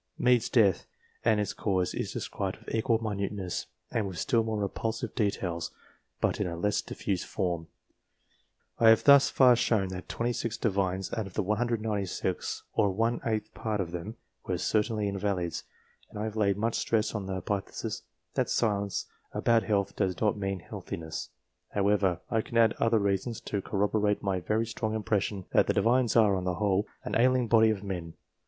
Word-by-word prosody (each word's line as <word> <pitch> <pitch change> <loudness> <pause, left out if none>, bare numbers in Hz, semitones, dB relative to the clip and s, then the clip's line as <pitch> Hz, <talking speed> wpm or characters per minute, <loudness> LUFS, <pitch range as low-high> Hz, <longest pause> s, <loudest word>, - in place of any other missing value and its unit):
Mede's 125 -2 +3
death, 105 -6 +3 0.4
and 110 -2 +3
its 105 - -1
cause, 95 -3 0
is - - -3
described - - -3
with - - -9
equal 115 +1 +2
minuteness, 100 -3 -3 0.2
and 110 -3 0
with 95 -3 -6
still 115 - +2
more 110 -1 -2
repulsive 110 +2 -2
details, 90 -6 -1 0.5
but - - 0
in - - +1
a 85 - -4
less 105 +4 +1
diffused 95 -3 -3
form. 85 -4 -2 1.1
I 115 - +7
have 115 - +6
thus 140 -1 +7
far 125 -2 +6
shown 110 -5 +1
that 95 0 -7
26 120 -1 -2
Divines 95 -3 -1
out 110 -3 -2
of 95 - -13
the 105 - +1
196, 105 -4 -1
or 100 - +3
one 115 +5 0
eighth 110 -2 -2
part 110 -2 -2
of 90 -3 -2
them, 90 +7 -6 0.3
were 90 - -2
certainly 105 +2 0
invalids, 100 -3 -2 0.4
and - - -10
I 105 - -2
have 110 -1 -4
laid 100 -3 +2
much 115 +2 0
stress 110 -1 +1
on 105 -3 -3
the 95 - -2
hypothesis 95 +2 -3 0.3
that - - 0
silence 100 -3 0 0.3
about 115 -1 +3
health 100 -3 0
does 95 -1 0
not 105 -2 +2
mean 95 -2 -3
healthiness; 80 -1 -6 0.5
however, 100 -3 +2
I 115 - +2
can 115 - -4
add 115 -2 +5
other 115 0 +3
reasons 100 +3 0
to 100 - -3
corroborate 105 +1 0
my 95 -2 0
very 110 +5 0
strong 110 -1 -3
impression 100 -2 -1
that - - +4
the - - +2
Divines 120 0 +3
are, 105 -4 +5
on 90 -1 -2
the 90 -1 0
whole, 100 0 +1 0.2
an - - -3
ailing 125 0 +3
body 110 0 +5
of 105 -2 -1
men. 85 -4 -5
105 Hz, 175 wpm, -29 LUFS, 95-110 Hz, 1.1 s, I